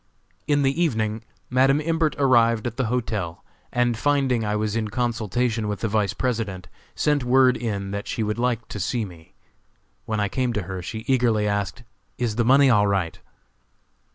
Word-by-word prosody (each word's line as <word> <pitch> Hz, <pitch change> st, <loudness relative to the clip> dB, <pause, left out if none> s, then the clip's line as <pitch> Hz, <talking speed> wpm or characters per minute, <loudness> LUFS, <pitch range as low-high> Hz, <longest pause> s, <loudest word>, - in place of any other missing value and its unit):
In 145 Hz, -1 st, +2 dB
the 140 Hz, +5 st, +1 dB
evening 110 Hz, -7 st, -1 dB, 0.3 s
Madam 135 Hz, +3 st, +4 dB
Imbert 160 Hz, 0 st, 0 dB
arrived 115 Hz, -5 st, +3 dB
at 120 Hz, -2 st, -3 dB
the 130 Hz, -, -1 dB
hotel, 110 Hz, -8 st, -3 dB, 0.3 s
and 120 Hz, -1 st, +1 dB
finding 135 Hz, -1 st, +1 dB
I 105 Hz, 0 st, -1 dB
was 105 Hz, 0 st, -1 dB
in 110 Hz, -1 st, -1 dB
consultation 115 Hz, 0 st, -1 dB
with 105 Hz, -1 st, -3 dB
the 115 Hz, -, 0 dB
Vice 105 Hz, -2 st, 0 dB
President, 110 Hz, -8 st, -2 dB, 0.3 s
sent 150 Hz, -3 st, +1 dB
word 125 Hz, 0 st, +4 dB
in 100 Hz, -5 st, -3 dB
that 100 Hz, 0 st, -4 dB
she 115 Hz, -, -2 dB
would 105 Hz, +2 st, -2 dB
like 120 Hz, -2 st, 0 dB
to 105 Hz, -, -6 dB
see 110 Hz, +4 st, -1 dB
me. 85 Hz, -4 st, -14 dB, 0.7 s
When 110 Hz, -1 st, -2 dB
I 105 Hz, -, +1 dB
came 125 Hz, +3 st, -1 dB
to 105 Hz, -, -2 dB
her 95 Hz, 0 st, -5 dB
she 110 Hz, +5 st, -6 dB
eagerly 115 Hz, -5 st, +2 dB
asked: 100 Hz, +2 st, -2 dB, 0.3 s
"Is 120 Hz, -3 st, -1 dB
the 120 Hz, -, +2 dB
money 135 Hz, +4 st, +5 dB
all 105 Hz, -5 st, +4 dB
right?" 95 Hz, -4 st, -1 dB
115 Hz, 180 wpm, -24 LUFS, 105-125 Hz, 0.7 s, money